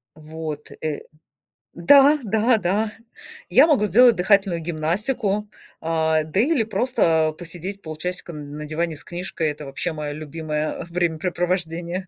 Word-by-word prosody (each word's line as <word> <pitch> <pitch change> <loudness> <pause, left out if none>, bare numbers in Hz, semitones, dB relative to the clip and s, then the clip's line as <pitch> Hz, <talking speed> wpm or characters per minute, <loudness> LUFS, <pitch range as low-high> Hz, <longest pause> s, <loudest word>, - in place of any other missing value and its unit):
Вот, 155 -1 -7
э 155 -2 -3 0.7
Да, 280 - +6
да, 220 +3 +2
да. 210 +4 -1 0.6
Я - - +7
могу 275 -10 +3
сделать 235 +4 +6
дыхательную 190 -2 +2
гимнастику, 200 +7 -1 0.3
а, 160 -1 +1
да 160 +6 0
или 275 -1 +3
просто 165 -9 +1
посидеть 180 +3 -6
полчасика 170 +3 -5
н 145 -1 -8
на 150 - -6
диване 160 +1 -2
с - - -4
книжкой. 175 -2 -3
Это 150 0 -8
вообще 150 +5 -3
мое 150 -1 -5
любимое 155 +1 -4
времяпрепровождение. 175 0 -2
170 Hz, 130 wpm, -22 LUFS, 155-205 Hz, 0.7 s, Я